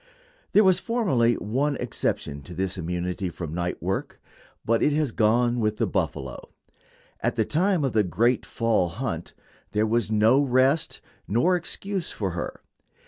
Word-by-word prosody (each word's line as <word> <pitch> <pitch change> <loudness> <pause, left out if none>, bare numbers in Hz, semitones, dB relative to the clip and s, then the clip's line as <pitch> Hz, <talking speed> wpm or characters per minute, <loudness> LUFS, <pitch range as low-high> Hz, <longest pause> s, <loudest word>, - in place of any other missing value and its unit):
There 210 - +7
was 185 -2 +4
formerly 155 - +2
one 135 +7 -1
exception 75 - -2
to 90 - -9
this 95 +1 -1
immunity 90 +1 -3
from 80 -2 -6
night 90 +1 -3
work, - - -3 0.5
but 115 0 +2
it 150 - +3
has 150 -4 +1
gone 120 +3 +2
with 105 -1 0
the - - +1
buffalo. - - -3 0.7
At - - -1
the 110 - +1
time 180 - +1
of 135 - 0
the 110 - +4
"great 110 +8 +1
fall 110 -6 +1
hunt" 85 - -5 0.4
there 105 +1 +2
was 115 0 +1
no 110 +5 +4
rest 135 +3 +2 0.3
nor 145 - +3
excuse 190 +1 -3
for 95 -4 -3
her. 85 0 -5
115 Hz, 155 wpm, -25 LUFS, 95-145 Hz, 0.7 s, There